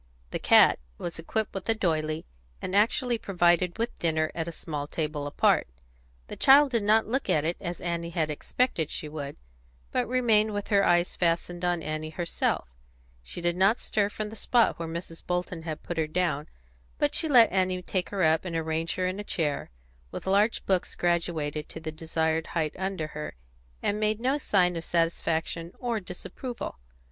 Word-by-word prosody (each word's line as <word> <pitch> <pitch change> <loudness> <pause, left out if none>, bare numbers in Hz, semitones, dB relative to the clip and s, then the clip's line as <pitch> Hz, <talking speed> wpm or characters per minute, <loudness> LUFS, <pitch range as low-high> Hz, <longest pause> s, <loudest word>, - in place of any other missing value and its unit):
The - - -2
cat - - +6 0.2
was 170 -1 -5
equipped 220 +6 -2
with 195 - -5
a 225 - +4
doily, 155 -5 -1 0.3
and 185 - -3
actually 235 +3 +2
provided 175 -2 +2
with 230 +1 -2
dinner 155 -2 +1
at 165 -1 -3
a - - -3
small 150 -3 -5
table 150 -2 -3
apart; 145 - +3 0.6
the - - -7
child 275 +1 +6
did 230 -3 +2
not 215 +2 +4
look 265 +5 -2
at 150 0 +2
it 170 +2 0
as 175 -2 -4
Annie 170 -1 -2
had 160 -3 -1
expected 160 - -1
she 155 - -4
would, 150 -2 -6 0.5
but - - 0
remained 220 -4 +3
with 205 - -4
her 200 -1 +4
eyes 175 -1 +3
fastened 175 0 0
on 175 -2 0
Annie 155 +1 -3
herself: 160 - -2 0.5
She 60 - -6
did 175 0 +1
not 195 +6 +4
stir 205 -2 0
from 210 0 -4
the - - -8
spot 235 -1 +2
where 165 - -3
Mrs. 165 0 -7
Bolton 180 -1 -2
had 160 -2 -6
put 175 - -5
her 155 - +1
down, 155 -3 0 0.5
but 145 - +1
she 320 - +2
let 240 -5 +7
Annie 185 -1 +1
take 180 0 -2
her 195 -2 -1
up 160 0 +3
and 175 -3 -4
arrange 160 0 -1
her 185 - 0
in 185 +2 -2
a - - -3
chair, 155 -7 -2 0.4
with - - -7
large 205 +4 +2
books 185 -2 0
graduated 165 -4 -1
to - - -7
the 160 0 -5
desired 160 0 -1
height 155 -2 0
under 190 -3 -2
her, 150 - -6 0.5
and 205 +1 0
made 215 0 +1
no 265 +5 +1
sign 180 -8 +2
of 165 - -4
satisfaction 165 0 -1
or 235 -3 -1
disapproval. 195 - -7
175 Hz, 185 wpm, -28 LUFS, 160-205 Hz, 0.6 s, let